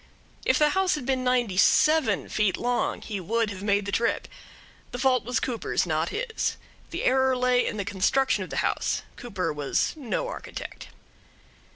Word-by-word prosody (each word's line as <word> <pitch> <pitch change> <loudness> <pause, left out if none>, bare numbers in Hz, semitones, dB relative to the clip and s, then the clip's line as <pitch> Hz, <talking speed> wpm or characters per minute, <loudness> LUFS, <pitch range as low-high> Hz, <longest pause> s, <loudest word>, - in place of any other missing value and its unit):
If - - +4
the 300 0 +4
house 380 0 +2
had 290 -5 -5
been 260 -1 0
ninety 245 -6 +1
seven 305 0 +4
feet 210 -3 +1
long 245 0 -1
he 205 -3 -4
would 225 +4 0
have 190 -1 -7
made 200 -1 +1
the 200 - -3
trip. 235 +3 0 0.6
The - - -6
fault 255 -1 +2
was 245 -1 0
Cooper's, 235 -2 -1
not - - 0
his. 480 -3 -2 0.3
The - - -4
error 260 0 +3
lay 250 0 +3
in 215 - -3
the 200 - -2
construction 205 +7 +1
of - - -9
the - - -1
house. - - -1
Cooper 190 -9 -3
was 145 -2 0
no 310 - -3
architect. - - -7
245 Hz, 175 wpm, -26 LUFS, 205-265 Hz, 0.6 s, If